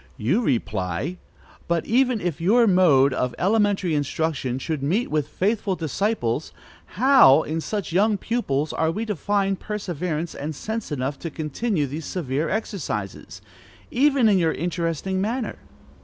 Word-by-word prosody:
You 135 - +1
reply: 110 - -1 0.5
"But 170 -1 0
even 250 -1 +2
if 170 -3 -3
your 230 +7 +4
mode 160 -9 +5
of 125 -1 -1
elementary 200 -3 +1
instruction 145 -3 -1
should 150 +2 -3
meet 185 - 0
with 150 -2 0
faithful 200 0 -1
disciples, 160 - -1 0.5
how, 240 - +6
in 160 +1 -3
such 205 +1 -4
young 205 +3 +3
pupils, 155 - -1
are 160 - +1
we 215 +7 -2
to 210 -2 -2
find 195 +2 0
perseverance 175 -5 -3
and 150 +2 -5
sense 220 +3 -5
enough 135 0 -2
to 165 - -5
continue 155 - -2
these 145 +3 -6
severe 150 -3 -2
exercises, 150 - -4 0.5
even 270 -2 +3
in 200 -3 +4
your 165 -2 +2
interesting 175 +2 -2
manner?" 230 +4 -2
170 Hz, 140 wpm, -23 LUFS, 145-210 Hz, 0.5 s, how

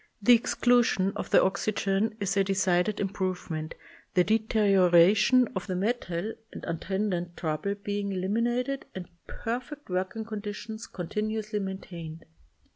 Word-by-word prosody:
The 220 +4 +6
exclusion 235 -4 +3
of - - -4
the - - +6
oxygen 200 +2 0
is 200 -1 -1
a 195 - +4
decided 190 +1 +1
improvement, 185 -5 -3 0.4
the 180 - +5
de 215 +5 +3
terioration 205 +3 +5
of 185 - -3
the 185 - -2
metal 205 -1 -2 0.2
and - - -8
attendant 175 0 -2
trouble 165 +5 -2
being 200 0 -3
eliminated 240 +8 -1
and 185 -2 -6 0.2
perfect 250 +2 -5
work 185 +1 -1
ing 220 -1 -4
conditions 215 +1 -6
continuously 210 +4 -3
maintained. 175 -4 -7
200 Hz, 125 wpm, -28 LUFS, 185-220 Hz, 0.4 s, The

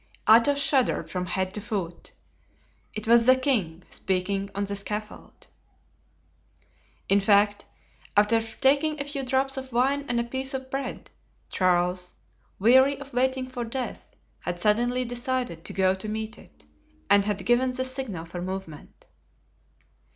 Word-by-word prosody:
Athos 235 +6 +6
shuddered 275 -2 +1
from 180 -1 -3
head 185 0 -1
to 210 - -4
foot. 190 -6 -5 0.8
It 215 0 -5
was 235 +1 +5
the 255 - +8
king 210 - 0
speaking 195 +1 -1
on 200 - -1
the 200 0 -4
scaffold. 210 +1 -5 1.6
In 200 - +4
fact, 205 +1 +3 0.5
after 215 +2 +4
taking 280 +7 +1
a - - -1
few 285 -1 -4
drops 270 +1 0
of 265 0 -6
wine 270 +4 +1
and 240 -1 +1
a - - +1
piece 265 +3 -4
of 260 0 -6
bread, 270 -1 -5 0.4
Charles, 180 0 +1 0.4
weary 260 +6 +5
of 280 -2 -11
waiting 260 +1 +1
for 255 -2 -5
death, 245 +2 -6 0.2
had 175 0 -4
suddenly 240 +6 +1
decided 245 - -2
to - - -5
go 190 -1 +3
to 190 +3 -6
meet 220 +1 -4
it 75 0 -18 0.4
and 200 0 +5
had 205 -2 -2
given 245 +2 +3
the 260 +1 -2
signal 255 -10 -4
for 175 +1 -7
movement. 185 -4 -7
230 Hz, 145 wpm, -26 LUFS, 195-260 Hz, 1.6 s, the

